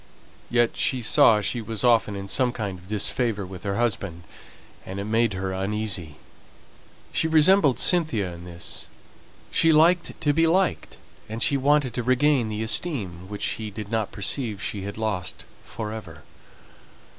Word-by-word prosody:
Yet 120 -1 +2
she 130 -2 0
saw 105 0 +5
she 120 +3 -2
was 110 +1 -4
often 115 -4 +3
in 100 0 -6
some 125 +4 +1
kind 100 -6 -4
of 90 - -17
disfavour 105 0 -1
with 90 -1 -9
her 100 -1 -2
husband, 100 -7 -2 0.6
and 95 +1 -6
it - - -3
made 110 0 +1
her 95 0 -3
uneasy. 95 -5 -3 1.0
She - - +2
resembled 160 - +5
Cynthia 120 - +1
in 85 0 -10
this: 85 -1 -6 0.6
she 165 - +4
liked 170 +3 +3
to 145 -1 +2
be 165 +2 +3
liked; 185 +3 0 0.3
and 110 +2 -3
she 140 - +2
wanted 140 -1 +2
to 125 - -2
regain 130 0 +2
the 110 +1 -3
esteem 110 - -2
which 105 -1 -6
she 110 -1 -2
did 105 0 -8
not 110 -3 -1
perceive 105 +1 -1
she 100 +1 -4
had 100 +2 -6
lost 105 -5 -3 0.2
for 110 -1 -6
ever. 85 -8 -9
110 Hz, 160 wpm, -25 LUFS, 100-130 Hz, 1.0 s, saw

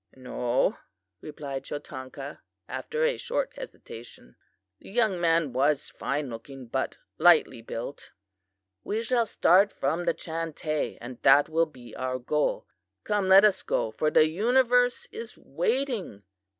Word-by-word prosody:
"'No,' 125 -1 -1 0.4
replied 140 -3 -6
Chotanka, 140 -1 -7 0.3
after 470 +1 -3
a 480 +1 +2
short - - -2
hesitation. 115 - -11 0.4
The - - -14
young 210 -4 +1
man 165 -4 +2
was 140 +2 +1
fine 145 +1 -3
looking, 125 +3 -9
but 130 +3 -3 0.2
lightly 155 -7 +5
built. 120 +4 -7 0.7
"'We 220 +2 -2
shall 235 -1 +1
start 195 +1 +4
from 160 +6 -1
the - - +1
Chantay, 160 -2 -3
and 120 0 -9
that 145 +1 +6
will 165 +1 +2
be 125 -5 -13
our 130 0 -2
goal. 145 +4 -1 0.4
Come, 205 -2 0
let 195 +2 +9
us 200 -3 +3
go, 110 - -1
for 155 +8 0
the 155 - +5
universe 245 +7 +2
is 230 0 -8
waiting! 210 - -2
155 Hz, 135 wpm, -27 LUFS, 130-210 Hz, 0.7 s, let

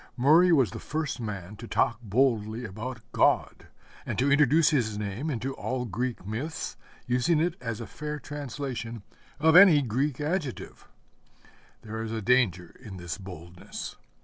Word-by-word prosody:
Murray 160 +8 +6
was 135 -8 +4
the - - -6
first 155 -4 -3
man 105 -3 -5
to 115 - -9
talk 115 -2 +1
boldly 115 0 +1
about 115 +4 -6
God, - - +1 0.4
and - - -4
to 135 +3 +2
introduce 145 +2 +5
his 115 -8 0
name 105 +9 -3
into 135 0 -2
all 130 -1 -3
Greek 120 0 -3
myths, 125 +11 -4 0.3
using 125 +7 +2
it 170 +1 +1
as 115 -3 -4
a 115 - -5
fair 150 +4 -5
translation 135 -6 -5 0.4
of 160 +2 +4
any 180 -5 +9
Greek 130 +3 -1
adjective. 150 -3 -3 1.0
There 110 0 -5
is 110 0 -4
a 115 - -2
danger 100 -7 +2
in 100 -3 -9
this 85 +3 -5
boldness. 90 -2 -8
125 Hz, 150 wpm, -28 LUFS, 110-145 Hz, 1.0 s, any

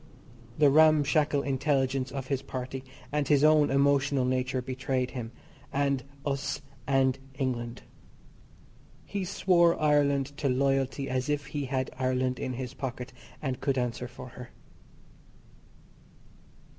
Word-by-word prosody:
The 145 -2 +5
ramshackle 150 -1 +4
intelligence 135 -1 0
of 135 -2 -4
his 135 -1 -1
party 130 0 -5 0.3
and 145 -1 0
his 145 -1 +4
own 155 -1 +5
emotional 140 -1 +3
nature 130 0 0
betrayed 130 0 -2
him 120 -3 -5 0.4
and 140 -2 +1 0.2
us 140 0 -2 0.2
and 135 -1 +2 0.2
England. 120 -3 -3 1.2
He 200 -1 -3
swore 175 -2 +3
Ireland 145 -2 +2
to 140 - 0
loyalty 135 +1 +1
as 130 +2 -1
if 145 -1 0
he 145 0 -4
had 130 0 -2
Ireland 130 0 0
in 130 - -3
his 125 0 -5
pocket, 125 -1 -5 0.3
and 130 -3 -2
could 135 -1 0
answer 125 0 -2
for 125 +1 -10
her. 125 +1 -10
135 Hz, 125 wpm, -29 LUFS, 130-145 Hz, 1.2 s, The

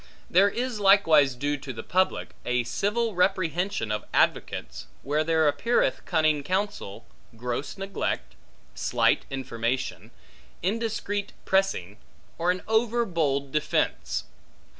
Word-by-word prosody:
There 195 +3 +6
is 240 0 -3
likewise 165 -9 +5
due 145 +3 -1
to 135 -1 -7
the 115 - -7
public, 185 +1 +1
a 125 0 +1
civil 210 - -1
reprehension 180 - 0
of 105 - -2
advocates, 60 +1 0 0.2
where 150 +3 +1
there 160 -1 +3
appeareth 235 +11 +1
cunning 155 -3 +2
counsel, 185 - -3 0.3
gross 120 - -4
neglect, 195 0 -3 0.4
slight - - +1
information, 130 -1 -3 0.5
indiscreet 205 0 -2
pressing, 190 - +1 0.4
or 170 +2 +1
an 180 0 0
overbold 190 - +1
defence. 60 - 0
165 Hz, 110 wpm, -26 LUFS, 135-200 Hz, 0.5 s, There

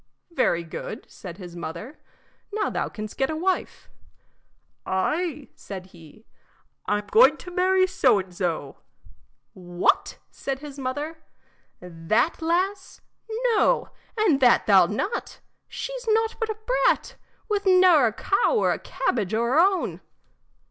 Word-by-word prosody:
"Very 255 - +1
good," 170 +6 -7
said 180 -3 -10
his 175 -3 -10
mother, 170 - -7 0.5
"now 420 0 -1
thou - - -2
canst 215 -1 -8
get 270 - +1
a 315 - -2
wife." 365 +4 -2 1.0
"Ay," 300 - -2
said 190 -2 -9
he, 170 +6 -16 0.6
"I'm 205 0 0
going 465 +2 +6
to 360 - -10
marry 370 +1 +3
so 260 - +3
an' 185 -1 -7
so." 170 -6 -3 0.8
"What!" 175 -1 0
said 275 -1 -4
his 285 0 -10
mother, 290 +5 -4 0.6
"that 180 - -1
lass? 370 +4 -1 0.5
No, 425 - +2 0.3
and 390 -11 +3
that 250 -3 +4
thou 195 -4 +6
'lt - - -6
not. 380 - -3 0.3
She's - - -6
nought 445 +1 +2
but 450 -2 -1
a 435 - -3 0.3
brat, - - +1 0.3
with 410 -2 -1
ne'er 365 -8 +6
a - - 0
cow 440 - +1
or 440 - +2
a - - -5
cabbage 215 -4 -2
o' 230 - +1
her 250 +6 +2
own." 380 +1 +2
270 Hz, 140 wpm, -25 LUFS, -, 1.0 s, going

